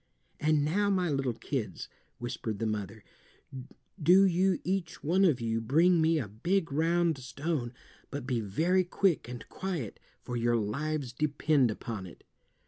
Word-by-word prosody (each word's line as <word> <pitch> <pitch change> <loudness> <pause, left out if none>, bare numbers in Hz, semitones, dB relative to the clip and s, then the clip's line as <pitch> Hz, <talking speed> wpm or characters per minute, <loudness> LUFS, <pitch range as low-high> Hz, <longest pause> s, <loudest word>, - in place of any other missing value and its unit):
"And 150 -1 +2
now, 200 +7 +1
my 185 -4 +1
little 135 -4 0
kids," 115 - -4 0.3
whispered 115 -3 -4
the 115 - -2
mother, 105 -1 -4 1.0
"do 180 +6 +7
you 185 0 +2
each 180 -3 -2
one 180 +6 +3
of 155 -9 +4
you 115 -1 -1
bring 165 +9 +4
me 160 +1 +3
a 130 -8 -2
big 165 - -1
round 165 +1 +2
stone, 130 0 -3 0.4
but 140 -3 -5
be 125 -3 0
very 165 - +2
quick 175 -6 +1
and 120 -3 -8
quiet, 175 - -4 0.2
for 125 - -5
your 120 0 +2
lives 135 +5 -2
depend 145 -1 +2
upon 110 -3 -5
it." 85 - -14
145 Hz, 150 wpm, -30 LUFS, 120-170 Hz, 1.0 s, do